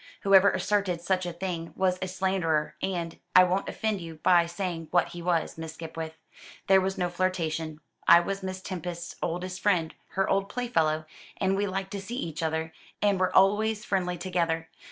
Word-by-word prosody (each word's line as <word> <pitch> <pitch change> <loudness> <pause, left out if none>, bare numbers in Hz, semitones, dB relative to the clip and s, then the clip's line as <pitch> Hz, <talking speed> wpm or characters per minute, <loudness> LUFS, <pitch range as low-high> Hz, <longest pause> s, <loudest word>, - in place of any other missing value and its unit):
Whoever 195 0 +6
asserted 200 -4 0
such 185 +1 0
a - - -2
thing 170 -1 -4
was 185 -1 +1
a 185 - -1
slanderer 180 -5 0
and 170 -3 -3 0.2
I 185 - +10
won't 185 +2 0
offend 215 -4 -2
you 165 -1 -7
by 170 +2 +4
saying 170 -2 -4
what 175 -1 +2
he 175 - -8
was, 170 -2 0
Miss 160 -1 -6
Skipwith. 160 -1 -6 0.5
There 190 0 +6
was 190 +1 -2
no 180 - +1
flirtation. 165 -4 -2 0.3
I 170 - +9
was 195 +3 -3
Miss 185 0 -5
Tempest's 175 -2 -5
oldest 180 +2 -3
friend 175 -6 +2 0.2
her 195 0 +1
old 195 0 +1
playfellow, 165 -10 0 0.3
and 190 0 +1
we 205 +1 0
liked 190 0 -3
to 200 - -4
see 230 +6 -6
each 165 - -4
other, 160 0 -2 0.3
and 200 -2 +2
were 185 - +1
always 210 +3 +3
friendly 180 -3 0
together. 170 -2 -1
180 Hz, 180 wpm, -28 LUFS, 165-195 Hz, 0.5 s, I